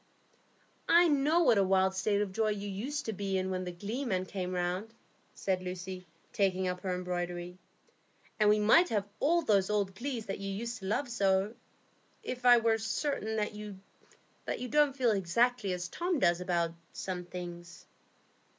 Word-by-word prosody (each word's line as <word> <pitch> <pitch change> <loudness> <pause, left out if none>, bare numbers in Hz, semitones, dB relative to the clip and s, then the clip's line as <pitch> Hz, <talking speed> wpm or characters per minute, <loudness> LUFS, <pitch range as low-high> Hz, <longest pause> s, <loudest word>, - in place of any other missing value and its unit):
'" - - -26
"I - - +4
know 300 +4 +3
what 225 -9 +5
a - - +4
wild 190 0 +3
state 200 +2 +1
of 200 - -5
joy 220 +3 0
you 205 -1 -3
used 260 +10 -4
to 220 - -2
be 195 -1 -2
in 190 0 -1
when 185 0 -2
the 180 - -4
glee 210 +10 -4
men 185 -7 -1
came 185 -1 -4
round," 180 +5 -2 0.4
said 185 -2 -1
Lucy, 185 0 -6 0.3
taking 190 -2 +1
up 180 0 -2
her 185 -2 -1
embroidery; 180 0 -4 0.8
"and 210 -1 +5
we 210 - +5
might 225 +13 +5
have 205 -2 -1
all 340 +4 +3
those 200 -6 +2
old 200 -2 0
glees 240 +1 -4
that 195 - -4
you 195 0 -4
used 230 +4 -4
to 190 - -9
love 245 +7 0
so, 200 -2 +1 0.7
if 250 - -2
I 245 0 +9
were 225 -1 +2
certain 220 0 -2
that 210 0 -1
you 210 -2 -8 0.9
don't 295 0 +3
feel 245 -4 +3
exactly 205 +3 +1
as 180 -1 -3
Tom 345 - -1
does 175 -7 +2
about 170 -2 0 0.2
some 180 -2 -4
things." 175 -1 -9
200 Hz, 180 wpm, -31 LUFS, 185-230 Hz, 0.9 s, I